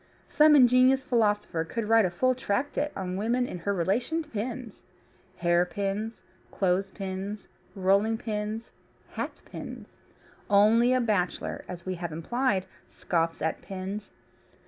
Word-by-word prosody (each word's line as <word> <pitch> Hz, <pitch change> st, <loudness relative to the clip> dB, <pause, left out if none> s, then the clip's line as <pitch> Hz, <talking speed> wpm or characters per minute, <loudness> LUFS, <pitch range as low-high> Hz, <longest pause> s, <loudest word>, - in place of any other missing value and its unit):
Some 305 Hz, 0 st, +6 dB
ingenious 255 Hz, 0 st, +5 dB
philosopher 210 Hz, -9 st, +1 dB
could 210 Hz, +6 st, -4 dB
write 225 Hz, -1 st, +5 dB
a -, -, +1 dB
full 255 Hz, +9 st, +2 dB
tractate 265 Hz, +5 st, -1 dB
on 185 Hz, -1 st, -3 dB
woman 235 Hz, +5 st, +1 dB
in 180 Hz, -, -6 dB
her 200 Hz, +4 st, -1 dB
relation 215 Hz, -, 0 dB
to 305 Hz, -, -20 dB
pins 235 Hz, 0 st, -5 dB, 0.5 s
hairpins, 195 Hz, +5 st, 0 dB, 0.3 s
clothes 190 Hz, +1 st, 0 dB
pins, 195 Hz, +1 st, -5 dB, 0.3 s
rolling 200 Hz, +4 st, +2 dB
pins, 215 Hz, 0 st, -4 dB, 0.4 s
hatpins. -, -, -7 dB, 0.5 s
Only 220 Hz, +4 st, +5 dB
a 255 Hz, 0 st, +3 dB
bachelor, 205 Hz, -6 st, -1 dB
as 175 Hz, -2 st, -8 dB
we 185 Hz, -, -2 dB
have 170 Hz, -2 st, -3 dB
implied, 195 Hz, +5 st, 0 dB, 0.2 s
scoffs 165 Hz, -2 st, -1 dB
at 160 Hz, -, -1 dB
pins. 195 Hz, +2 st, -6 dB
205 Hz, 125 wpm, -28 LUFS, 185-240 Hz, 0.5 s, Some